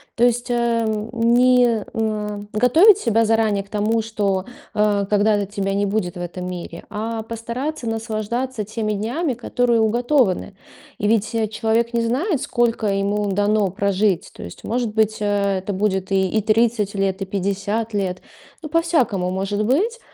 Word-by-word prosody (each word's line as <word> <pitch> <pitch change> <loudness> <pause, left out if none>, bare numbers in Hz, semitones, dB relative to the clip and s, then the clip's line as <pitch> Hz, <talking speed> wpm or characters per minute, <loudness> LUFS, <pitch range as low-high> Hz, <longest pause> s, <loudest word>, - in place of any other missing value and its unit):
То 240 - +1
есть, 245 +1 0
эм, 230 -2 0
не, 245 +1 +4
м, 225 -4 -1
а, 210 -2 -2
готовить 335 - +6
себя 230 - +2
заранее 220 -3 +2
к 200 - -23
тому, 220 +2 0
что, 200 -4 -1 0.3
э, 205 -1 +2
когда-то 205 -1 +2
тебя 195 -1 -2
не 200 0 +1
будет 195 -4 -1
в - - -5
этом 180 +1 -5
мире, 175 -2 -7
а 220 +1 -3
постараться 235 +4 -4
наслаждаться 225 +2 -3
теми 215 0 -3
днями, 245 - -1
которые 240 0 +1
уготованы. 235 -3 +1 0.4
И 205 - 0
ведь, 220 +1 +1
э, 225 -1 0
человек 225 +2 0
не 235 - +2
знает, 280 - 0
сколько 235 -3 0
ему 200 +1 0
дано 205 0 +2
прожить. 200 -1 0
То - - -9
есть, 85 - -10
может 235 -1 -2
быть, 220 0 +1
э, 200 -1 +1
это 190 +2 -4
будет 190 -1 -1
и 190 -1 +2
и 215 +2 +1
30 220 -1 +2
лет, 195 -1 -1
и - - -5
50 200 +3 -2
лет. 185 -2 -2 0.4
Ну, 310 - -7
по-всякому 255 - +1
может 195 +3 -1
быть. 405 - +1
215 Hz, 165 wpm, -21 LUFS, 200-235 Hz, 0.4 s, готовить